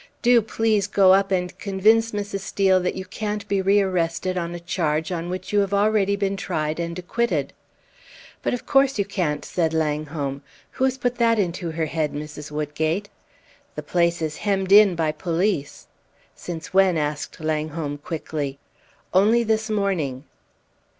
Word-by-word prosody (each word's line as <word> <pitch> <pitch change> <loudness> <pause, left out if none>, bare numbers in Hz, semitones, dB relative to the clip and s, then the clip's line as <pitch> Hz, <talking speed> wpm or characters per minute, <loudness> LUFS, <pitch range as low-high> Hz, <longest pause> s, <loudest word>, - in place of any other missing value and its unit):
"Do 240 -1 +6
please 215 -2 0
go 195 -2 +5
up 195 0 +2
and 180 -2 -1
convince 215 +3 +3
Mrs. 205 -1 -3
Steel 190 -1 +2
that 180 0 -2
you 190 - -5
can't 210 +2 -4
be 200 -1 +1
rearrested 185 -2 +1
on 170 -1 -3
a - - -6
charge 160 -2 -1
on 175 -1 -3
which 185 +2 -5
you 205 - +4
have 200 0 +1
already 200 -1 +2
been 200 -1 -1
tried 155 -5 -2
and 170 0 -3
acquitted!" 180 - -1 0.9
"But - - 0
of 245 - -9
course 270 -2 +3
you 200 - +1
can't," 175 -7 -2
said 165 -2 -1
Langholm. 150 -3 -2 0.3
"Who 260 - 0
has 265 0 0
put 245 -1 -1
that 230 -1 +3
into 175 -3 -1
her 160 0 -2
head, 155 -1 -2
Mrs. 150 0 -7
Woodgate?" 155 +6 -2 0.7
"The - - -5
place 170 -1 +1
is 155 -1 -3
hemmed 195 -2 -1
in 205 -2 +7
by 160 -2 0
police." 170 -2 -2 0.5
"Since 175 +2 -7
when?" 190 -3 +4
asked 150 -1 -3
Langholm, 155 -1 -3
quickly. 150 -3 -4 0.6
"Only 215 +6 +4
this 220 0 0
morning." 180 -11 -1
185 Hz, 160 wpm, -23 LUFS, 160-205 Hz, 0.9 s, in